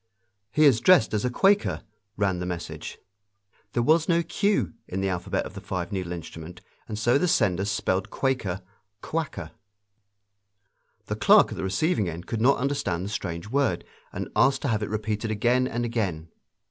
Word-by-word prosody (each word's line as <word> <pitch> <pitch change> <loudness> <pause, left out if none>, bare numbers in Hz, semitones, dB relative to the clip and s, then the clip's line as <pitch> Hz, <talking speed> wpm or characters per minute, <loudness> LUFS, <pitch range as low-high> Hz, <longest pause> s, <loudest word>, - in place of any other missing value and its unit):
"He 150 +9 +3
is 130 -6 +6
dressed 180 -7 +5
as 105 - 0
a - - +2
Quaker," 195 +10 +2 0.3
ran 95 -3 +1
the 90 - -3
message. 90 -2 -6 0.8
There 120 - +1
was 160 +5 +3
no 170 0 +3
Q 200 - 0
in 95 - -4
the 95 0 0
alphabet 95 +2 -2
of - - -8
the 100 - -8
five 95 -4 -4
needle 95 -3 -3
instrument, 85 0 -8 0.3
and 105 - -5
so 120 +5 +3
the 180 - +1
sender 100 - +2
spelled 95 -2 -1
Quaker, 105 -9 -1 0.4
Kwaker. 150 - -4 1.5
The - - -3
clerk - - +5
at - - -4
the - - -3
receiving 100 - +1
end 85 +2 -7
could 115 - -3
not 135 +4 +5
understand 115 -10 -1
the - - -4
strange 90 -2 -4
word, 135 -10 +1 0.3
and - - -5
asked 130 +5 +3
to 140 - 0
have 110 -2 0
it 105 - -3
repeated 110 +1 -2
again 120 +4 +2
and 120 -1 -2
again. 95 -9 -2
105 Hz, 175 wpm, -26 LUFS, 95-130 Hz, 1.5 s, is